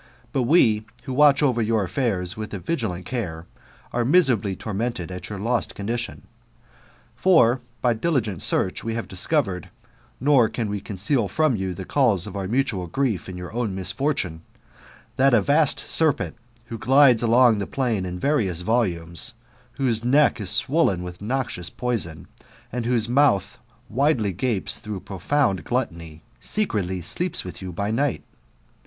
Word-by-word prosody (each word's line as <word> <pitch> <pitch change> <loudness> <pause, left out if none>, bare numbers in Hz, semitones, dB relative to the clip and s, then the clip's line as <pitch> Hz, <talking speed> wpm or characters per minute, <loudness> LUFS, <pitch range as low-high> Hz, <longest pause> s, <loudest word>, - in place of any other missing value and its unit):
But 130 - 0
we, 110 -10 +4 0.2
who 130 - -5
watch 145 +1 +5
over 125 -5 +2
your 110 -1 +1
affairs 90 -3 -1
with 110 -1 -6
a - - -5
vigilant 95 - -3
care, 90 -9 -4 0.5
are 120 - +1
miserably 120 - +3
tormented 105 -3 -4
at 90 0 -7
your 105 - -5
lost 115 +4 -1
condition. 120 +4 -4 0.9
For, 130 -10 +4 0.2
by 120 -2 +4
diligent 115 - -1
search, 95 - 0
we 115 0 -3
have 115 - -4
discovered, 95 - 0 0.5
(nor 130 -4 +4
can 115 -3 -3
we 105 - -2
conceal 105 +4 -1
from 155 - +1
you 95 -3 -3
the 95 - -7
cause 115 -10 +2
of 105 -2 -8
our 95 -2 -3
mutual 110 -6 0
grief, 110 -1 -1
and 90 -1 -7
your 90 +3 -8
own 115 -5 -2
misfortune), 95 - -1 0.8
that 135 -1 +5
a - - +5
vast 150 +1 +2
serpent 160 -4 +1 0.3
who 115 -1 -7
glides 130 -1 +5
along 120 -1 +4
the 100 - -3
plain 120 -8 -1
in 90 -1 -4
various 100 - 0
volumes, 90 -7 -1 0.4
whose 120 -5 0
neck 140 -1 +3
is 95 - 0
swollen 115 - +2
with 90 0 -8
noxious 115 -6 -2
poison, 115 -11 -3 0.4
and 120 -1 -3
whose 120 -3 +2
mouth 120 -7 +2 0.3
widely 120 -5 +1
gapes 105 +1 0
through 105 -4 -6
profound 100 - 0
gluttony, 85 -11 -4 0.2
secretly 100 - -1
sleeps 175 - -1
with 90 - -9
you 95 -1 -6
by 100 +4 -2
night. 135 +4 0
115 Hz, 155 wpm, -23 LUFS, 95-130 Hz, 0.9 s, watch